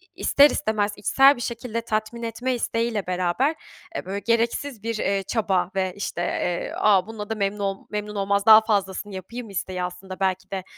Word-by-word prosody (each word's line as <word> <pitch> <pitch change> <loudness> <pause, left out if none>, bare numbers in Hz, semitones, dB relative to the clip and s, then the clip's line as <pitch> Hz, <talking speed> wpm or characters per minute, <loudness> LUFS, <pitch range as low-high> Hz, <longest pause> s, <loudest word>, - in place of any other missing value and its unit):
ister 285 +1 +5
istemez 215 -8 0
içsel 270 +7 +5
bir 240 - -8
şekilde 230 -1 -3
tatmin 220 +1 -3
etme 245 +3 -2
isteğiyle 230 -3 -1
beraber, 185 - +1 0.4
eee, - - -4
böyle, 195 +2 -3
gereksiz 235 +2 -1
bir, 230 0 -2
eee, 195 -1 0
çaba 190 -4 0
ve, 190 -1 0
işte, 200 -3 -4
eee, 175 0 -2
"A, 195 -3 +4
bununla 215 -2 -7
da 225 - -1
memnun 200 0 -1
ol 195 -1 -1
memnun 210 0 -4
olmaz, 200 0 0
daha 220 -1 +9
fazlasını 205 -2 -1
yapayım." 230 +5 -7
isteği 185 -2 -3
aslında 180 +1 -7
belki 190 0 -1
de, 190 -1 -3
210 Hz, 180 wpm, -24 LUFS, 190-230 Hz, 0.4 s, daha